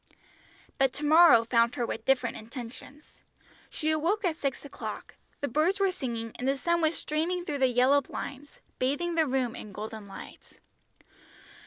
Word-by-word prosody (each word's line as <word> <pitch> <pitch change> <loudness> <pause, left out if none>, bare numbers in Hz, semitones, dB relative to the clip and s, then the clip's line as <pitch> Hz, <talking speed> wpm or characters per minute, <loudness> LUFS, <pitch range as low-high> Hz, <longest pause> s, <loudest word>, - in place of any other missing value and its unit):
But 270 -1 +3
to 295 - -4
morrow 315 -6 +7
found 235 +1 +2
her 245 -4 -1
with 225 -1 -5
different 260 -3 +2
intentions. 250 +5 -10 0.5
She 310 0 -1
awoke 350 +7 0
at 335 -3 +1
six 280 -3 -3
o'clock, 285 - -7 0.3
the 285 - 0
birds 315 +10 +1
were 390 -1 +3
singing, 235 -9 -4
and 250 - -2
the 275 +1 +2
sun 340 +4 +1
was 320 +1 +1
streaming 345 +4 -1
through 295 -5 -3
the 260 - +4
yellow 255 +3 +4
blinds, 280 +1 -8 0.2
bathing 290 +7 0
the 320 -2 +2
room 255 -3 0
in 210 - -9
golden 215 +1 -7
light. 195 - -11
275 Hz, 165 wpm, -28 LUFS, 245-315 Hz, 0.5 s, morrow